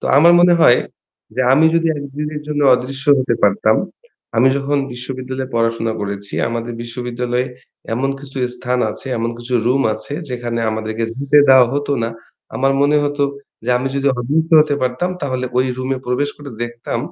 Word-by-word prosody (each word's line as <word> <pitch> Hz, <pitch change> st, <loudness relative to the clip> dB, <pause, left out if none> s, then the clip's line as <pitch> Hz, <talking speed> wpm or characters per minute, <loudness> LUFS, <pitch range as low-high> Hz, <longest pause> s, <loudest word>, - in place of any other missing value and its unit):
তো -, -, -8 dB
আমার 170 Hz, +4 st, +7 dB
মনে 175 Hz, 0 st, +6 dB
হয় 120 Hz, -6 st, +6 dB, 0.6 s
যে -, -, -1 dB
আমি 155 Hz, +4 st, +5 dB
যদি 165 Hz, 0 st, +2 dB
একদিনের 150 Hz, +2 st, -5 dB
জন্য 150 Hz, -1 st, -1 dB
অদৃশ্য 135 Hz, +3 st, -5 dB
হতে 130 Hz, -, +1 dB
পারতাম, -, -, +3 dB, 0.6 s
আমি 125 Hz, +4 st, +5 dB
যখন 140 Hz, +1 st, 0 dB
বিশ্ববিদ্যালয়ে 130 Hz, +1 st, -6 dB
পড়াশোনা 115 Hz, -1 st, 0 dB
করেছি, 100 Hz, 0 st, -5 dB
আমাদের 115 Hz, 0 st, -4 dB
বিশ্ববিদ্যালয়ে 125 Hz, +1 st, -3 dB, 0.5 s
এমন 135 Hz, +3 st, 0 dB
কিছু 135 Hz, -1 st, -12 dB, 0.2 s
স্থান 125 Hz, 0 st, -1 dB
আছে, 120 Hz, -, -9 dB
এমন 115 Hz, +1 st, -1 dB
কিছু 120 Hz, +1 st, -4 dB
room 135 Hz, +3 st, +3 dB
আছে 110 Hz, +5 st, -7 dB, 0.2 s
যেখানে 120 Hz, -1 st, -3 dB
আমাদেরকে 110 Hz, +1 st, -3 dB
যেতে 140 Hz, +2 st, +3 dB
দেওয়া 130 Hz, -2 st, +7 dB
হতো 145 Hz, 0 st, -1 dB
না। 115 Hz, -, 0 dB, 0.5 s
আমার 135 Hz, +1 st, +2 dB
মনে 145 Hz, +1 st, +3 dB
হতো 145 Hz, 0 st, -1 dB, 0.4 s
যে 125 Hz, -, -1 dB
আমি 130 Hz, +2 st, -2 dB
যদি 140 Hz, 0 st, -1 dB
অদৃশ্য 160 Hz, +7 st, 0 dB
হতে 150 Hz, -1 st, +2 dB
পারতাম 130 Hz, +8 st, -1 dB
তাহলে 130 Hz, -2 st, -2 dB
ওই 130 Hz, -, +2 dB
room 130 Hz, +1 st, -4 dB
এ -, -, -6 dB
প্রবেশ 140 Hz, +4 st, 0 dB
করে 145 Hz, -1 st, -10 dB
দেখতাম 120 Hz, 0 st, -4 dB
130 Hz, 170 wpm, -18 LUFS, 120-145 Hz, 0.6 s, আমার